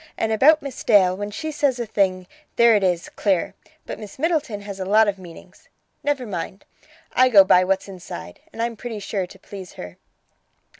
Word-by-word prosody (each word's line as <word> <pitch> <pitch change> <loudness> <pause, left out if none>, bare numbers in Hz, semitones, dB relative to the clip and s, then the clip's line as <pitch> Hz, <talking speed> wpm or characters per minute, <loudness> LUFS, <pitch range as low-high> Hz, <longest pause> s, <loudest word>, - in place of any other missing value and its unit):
And 220 - -1
about 290 +8 +5
Miss 275 -3 -7
Dale, 190 -5 +4
when 205 +1 -5
she 315 +9 -5
says 285 -4 0
a 240 - -3
thing, 190 -3 0 0.3
there 235 -1 +6
it 205 - +1
is, 180 -2 0
clear. 190 -5 0 0.3
But - - -7
Miss 210 -2 -10
Middleton 300 -9 -1
has 200 -1 -8
a - - -2
lot 215 +3 +4
of 200 -1 -2
meanings. 175 -3 -14 0.3
Never 285 -3 -1
mind; 190 -1 -6 0.5
I 255 0 +5
go 200 -5 +8
by 185 -1 +5
what's 190 +1 -1
inside, 170 - -9
and 230 - -4
I'm 235 0 -2
pretty 230 0 -6
sure 200 -2 -3
to 190 - -15
please 190 -1 -10
her." 90 0 -10
205 Hz, 195 wpm, -22 LUFS, 185-235 Hz, 0.5 s, go